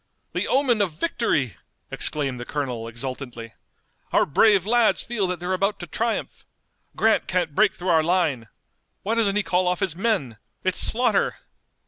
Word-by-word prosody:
"The - - -1
omen 255 -5 +2
of 185 -6 0
victory!" 150 - -1 0.3
exclaimed 135 -4 0
the - - -5
colonel 125 -5 -4
exultantly. 120 -1 -6 0.6
"Our - - +3
brave 195 +5 +4
lads 235 +1 +3
feel 215 -5 -1
that 180 -1 -3
they're 180 +1 -2
about 195 +2 0
to - - -5
triumph! 230 +7 -3 0.5
Grant 220 0 +2
can't 175 -4 -1
break 205 +4 +3
through 180 +1 -4
our 165 -2 +5
line! 155 -9 0 0.6
Why 215 - -1
doesn't 215 -4 +1
he 210 - +2
call 180 -1 +1
off 180 0 0
his 170 -4 -1
men? 185 - -1 0.3
It's 185 -2 +1
slaughter!" 245 +2 +2
180 Hz, 160 wpm, -24 LUFS, 140-215 Hz, 0.6 s, our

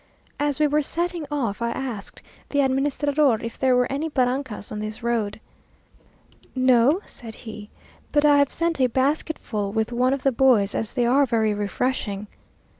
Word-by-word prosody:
As 290 0 0
we 305 - +4
were 300 +1 +2
setting 340 +1 -2
off, 240 -8 -2
I 235 - 0
asked 235 -5 -6 0.3
the 285 - +2
administrador 275 -1 +1
if 230 0 -7
there 260 -1 +3
were 250 0 +3
any 295 +4 -2
barrancas 255 -5 -1
on 210 - -4
this 215 +1 -6
road. 225 -3 -1 1.2
"No," 255 - +4
said 225 -3 -10
he, 215 -2 -9 0.4
"but 295 0 +3
I 290 -1 +6
have 285 -1 +3
sent 335 -4 -1
a 255 - +5
basketful 260 -5 -1
with 220 +2 -1
one 250 +2 +2
of 275 -1 -2
the 270 - +3
boys, 230 -6 +3
as 220 - -3
they 245 - +1
are 270 +3 +4
very 220 -3 +1
refreshing." 205 0 -2
255 Hz, 170 wpm, -24 LUFS, 220-285 Hz, 1.2 s, I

